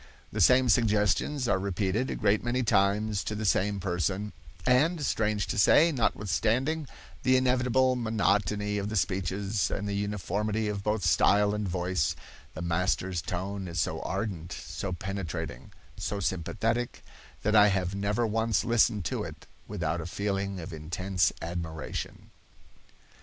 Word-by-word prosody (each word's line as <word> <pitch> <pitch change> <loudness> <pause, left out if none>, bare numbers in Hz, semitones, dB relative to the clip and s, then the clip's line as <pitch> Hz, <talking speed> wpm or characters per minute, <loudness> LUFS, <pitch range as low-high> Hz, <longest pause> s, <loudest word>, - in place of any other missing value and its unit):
"The - - -2
same 130 0 +6
suggestions 110 +4 +2
are 100 -3 +2
repeated 100 +5 -1
a - - -2
great 105 0 +2
many 125 +2 0
times 105 -1 +2
to 105 - -3
the 110 +1 -3
same 100 0 +2
person, 95 +2 -2 0.3
and, 145 +5 +3
strange 105 -4 0
to - - -2
say, 160 - +6
notwithstanding 125 - 0 0.3
the 130 0 +4
inevitable 130 0 +2
monotony 105 -3 0
of 100 +1 -3
the 110 - -4
speeches, 95 +2 0
and 105 - -3
the 100 - -2
uniformity 105 +2 -1
of 100 -1 -3
both 105 -2 -1
style 100 +7 +4
and 105 -1 -2
voice, 90 -3 0 0.4
the 85 - -5
master's 90 +1 0
tone 95 +2 -4
is 85 -1 -4
so - - -1
ardent, 90 -6 -4
so 95 - -5
penetrating, 85 -8 -5 0.3
so 100 - -3
sympathetic, 110 +6 -2 0.4
that 105 +2 +2
I 105 -1 +8
have 95 -2 0
never 100 +4 0
once 110 -4 +1
listened 115 -4 +2
to - - -2
it - - -8 0.2
without 85 - -2
a 80 - -6
feeling 100 0 -2
of 85 +1 -7
intense 85 +4 0
admiration." 80 -2 -5
100 Hz, 145 wpm, -28 LUFS, 95-110 Hz, 0.4 s, I